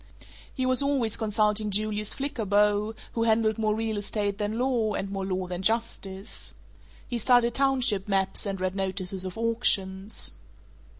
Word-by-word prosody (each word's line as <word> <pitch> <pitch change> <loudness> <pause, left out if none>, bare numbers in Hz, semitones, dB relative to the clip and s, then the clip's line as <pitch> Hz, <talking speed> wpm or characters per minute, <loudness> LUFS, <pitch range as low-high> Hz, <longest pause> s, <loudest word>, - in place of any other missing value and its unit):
He 260 - -2
was 255 +1 +4
always 270 -6 +2
consulting 215 -1 +1
Julius 210 +1 0
Flickerbaugh, 210 -5 +1 0.2
who 230 - -1
handled 220 -1 +2
more 215 -1 +1
real 220 -1 -2
estate 205 0 -2
than 210 +1 -2
law, 240 -4 +1
and 195 0 -3
more 195 -1 -3
law 185 -1 -1
than 180 0 -4
justice. 200 -2 -2 0.5
He 240 - -2
studied 240 0 +4
township 255 -8 +2
maps, 195 +1 +2
and 195 -1 -3
read 185 0 -2
notices 190 -1 -1
of 185 +1 -6
auctions. 205 -4 0
210 Hz, 145 wpm, -27 LUFS, 195-230 Hz, 0.5 s, was